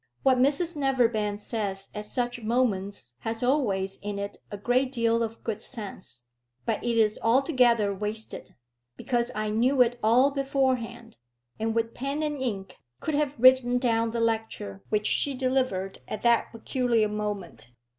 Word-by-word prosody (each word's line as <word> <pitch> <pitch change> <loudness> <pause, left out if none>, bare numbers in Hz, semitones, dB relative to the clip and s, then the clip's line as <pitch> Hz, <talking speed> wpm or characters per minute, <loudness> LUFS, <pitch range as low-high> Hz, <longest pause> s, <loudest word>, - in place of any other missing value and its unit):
What 260 -2 +4
Mrs 300 +6 +2
Neverbend 235 -7 +1
says 200 -3 -4
at 210 0 -6
such 240 +1 -2
moments 205 - -1
has 225 +1 -3
always 200 -8 +1
in 205 0 -5
it 200 0 -5
a 205 - -6
great 250 +5 +1
deal 230 -2 +1
of 225 0 -4
good 220 -2 -3
sense; 200 - -8 0.4
but - - -1
it 235 -1 0
is 215 -1 +3
altogether 240 -4 +3
wasted, 210 +2 -5 0.4
because 240 -2 0
I 215 0 -1
knew 250 +4 +4
it 240 0 -3
all 245 +6 +4
beforehand, 260 -4 -1 0.4
and 225 +1 -1
with 230 0 0
pen 280 +4 -3
and 295 -2 -2
ink 205 -7 -4 0.2
could 310 - -3
have 290 -3 0
written 255 0 +6
down 230 -2 +1
the 230 +1 -3
lecture 220 - -2
which 210 0 0
she 280 +5 +1
delivered 255 -8 -1
at - - -5
that 235 -1 +3
peculiar 230 -1 +1
moment. 200 - -5
230 Hz, 155 wpm, -27 LUFS, 210-255 Hz, 0.4 s, written